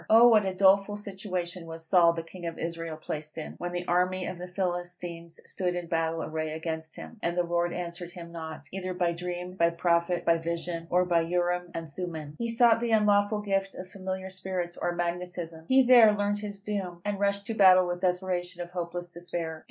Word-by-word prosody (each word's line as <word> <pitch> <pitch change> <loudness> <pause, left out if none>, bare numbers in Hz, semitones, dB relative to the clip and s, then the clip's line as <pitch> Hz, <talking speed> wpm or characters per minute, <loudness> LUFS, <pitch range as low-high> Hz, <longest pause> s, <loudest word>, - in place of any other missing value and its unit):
Oh, 230 +2 +8
what 215 -4 +5
a 190 - -1
doleful 195 +2 +4
situation 185 -4 -5
was 165 0 -7
Saul 170 -1 +5
the 165 -1 -4
king 175 +1 -8
of 165 - -5
Israel 165 -1 -4
placed 155 0 -6
in, 160 - -5
when 175 0 -3
the 175 0 -4
army 180 +1 +1
of 180 - -5
the 180 - -6
Philistines 175 -2 -3
stood 180 -1 -2
in 175 -1 -3
battle 165 -1 -1
array 155 0 -3
against 160 0 -4
him, - - -10
and 170 +1 -1
the 175 - +3
Lord 175 0 0
answered 175 0 -5
him 170 -1 -9
not, 160 -3 -7
either 185 -1 -3
by 175 -1 +1
dream, 180 +1 -5
by 170 -2 +3
Prophet, 170 +1 +1
by 165 0 +4
vision, 170 0 -4
or 180 +1 +3
by 170 -2 +3
Urim 175 +1 0
and 165 -3 -6
Thummim! 160 -5 -5
He 235 - -1
sought 230 0 +4
the 235 - 0
unlawful 210 -1 +3
gift 195 -1 -1
of 185 0 -8
familiar 190 0 -5
spirits, 185 -2 -4
or 175 - -1
"Magnetism." 175 -1 -4
He 265 0 +6
there 240 -4 +8
learned 205 0 0
his 205 -1 -6
doom, 190 -4 -4
and 205 -1 -1
rushed 200 0 +1
to 225 - -3
battle 185 -3 +7
with 175 0 -3
the 185 - +4
desperation 180 -1 -2
of 175 - -11
hopeless 175 0 -5
despair. 170 -2 -4
175 Hz, 205 wpm, -28 LUFS, 170-190 Hz, -, Oh